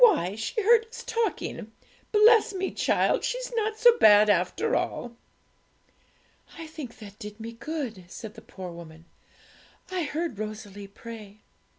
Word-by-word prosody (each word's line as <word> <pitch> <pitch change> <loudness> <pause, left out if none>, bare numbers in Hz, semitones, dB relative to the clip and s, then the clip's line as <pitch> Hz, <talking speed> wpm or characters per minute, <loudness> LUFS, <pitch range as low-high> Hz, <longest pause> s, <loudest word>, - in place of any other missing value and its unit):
Why, 190 - +5
she 225 - -3
heard 455 +1 +5
us 470 +1 -9
talking; 455 - -2 0.4
bless 435 0 +5
me, 380 0 -2
child! - - +1
she's - - -3
not 435 -1 0
so 480 +1 +6
bad 210 0 +7
after 205 - +1
all.' 240 -1 -2 1.4
'I 330 - -7
think 310 -6 -9
that 205 -1 -12
did 210 -1 -9
me 225 +1 -6
good,' 235 - -5
said 215 +3 -9
the 225 - -12
poor 185 -4 -9
woman; 165 -1 -12 0.9
'I 365 -2 -1
heard 300 -6 -3
Rosalie 210 -2 -6
pray.' 215 0 -11
230 Hz, 145 wpm, -27 LUFS, -, 1.4 s, bad